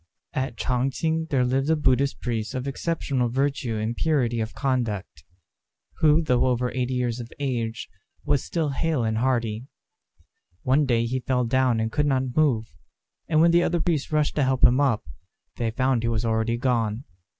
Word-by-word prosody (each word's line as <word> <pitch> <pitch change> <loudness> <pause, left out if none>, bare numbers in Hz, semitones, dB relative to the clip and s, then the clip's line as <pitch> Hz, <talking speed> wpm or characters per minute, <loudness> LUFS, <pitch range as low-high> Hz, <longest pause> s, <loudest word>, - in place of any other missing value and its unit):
At 130 -2 -3
Ch'ang 125 +1 0
ch'ing 160 +5 -1
there 130 -4 +2
lived 135 +3 0
a 160 - +4
Buddhist 140 -2 +1
priest 115 0 -3
of 130 +1 -3
exceptional 140 -4 -1
virtue 135 -2 -1
and 110 +2 -2
purity 125 -7 +1
of 110 0 -4
conduct, 115 - -2 0.7
who, 160 0 +4
though 125 -4 +2
over 125 0 0
eighty 130 0 -2
years 125 -1 -1
of 120 -1 -8
age, 120 -5 -3 0.4
was 140 - +1
still 160 -3 -1
hale 145 -1 0
and 110 0 0
hearty. 120 -2 -1 1.0
One 140 +3 +2
day 115 -2 +2
he 130 +3 -1
fell 125 -1 0
down 125 -1 +2
and 110 0 -1
could 150 +4 +1
not 130 -2 0
move; 120 - +1 0.5
and 155 -1 +3
when 170 +1 +5
the 170 +1 +5
other 175 0 +1
priests 160 -4 -1
rushed 150 -1 +1
to 145 - +3
help 130 -1 0
him 125 +2 +6
up, 130 -7 +1 0.5
they 115 -2 -1
found 130 +1 +1
he 115 - -1
was 115 0 -1
already 110 +1 0
gone. 120 -2 0
130 Hz, 180 wpm, -25 LUFS, 115-140 Hz, 1.0 s, him